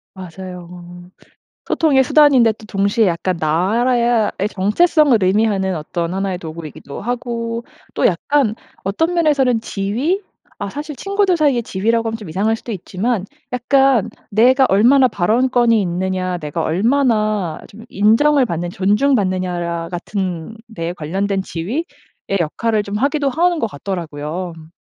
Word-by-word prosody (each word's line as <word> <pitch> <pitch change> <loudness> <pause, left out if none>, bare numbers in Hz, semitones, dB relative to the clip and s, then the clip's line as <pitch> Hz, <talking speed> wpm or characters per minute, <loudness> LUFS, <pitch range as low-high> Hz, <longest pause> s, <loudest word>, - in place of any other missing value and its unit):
맞아요. 180 -1 -9 1.0
소통의 275 -5 +3
수단인데 265 -5 +5
또 215 - -16
동시에 200 +2 +1
약간 180 +1 -1
나라야 225 +8 +2
의 200 - 0
정체성을 250 - +3
의미하는 190 0 +1
어떤 170 +3 -3
하나의 190 -1 -2
도구이기도 160 -4 -8
하고 235 -1 -3 0.3
또 - - +2
약간 220 +6 +1 0.3
어떤 320 - 0
면에서는 280 -8 +2
지위? 230 - -1 0.4
아 - - -4
사실 295 +1 -6
친구들 395 +5 +1
사이의 285 -7 +2
지위라고 225 +4 0
하면 225 - -3
좀 210 -5 -10
이상할 200 +7 0
수도 225 - -8
있지만 200 +2 -2 0.3
약간 255 -2 +3 0.2
내가 255 +5 +4
얼마나 250 +7 +5
발언권이 230 +3 +2
있느냐 185 0 -2
내가 155 +1 -4
얼마나 215 - +1
좀 220 +3 -13
인정을 255 +8 +3
받는 175 -5 -3
존중받느냐야 185 -6 0
같은 180 0 -4 0.2
데에 165 0 -3
관련된 190 +4 -2
지위의 200 - -3 0.6
역할을 215 +7 0
좀 205 0 -5
하기도 280 +2 +1
하는 345 +5 +1
것 230 - 0
같더라고요. 170 0 -5
음. 160 0 -14
210 Hz, 320 characters per minute, -18 LUFS, 185-250 Hz, 1.0 s, 수단인데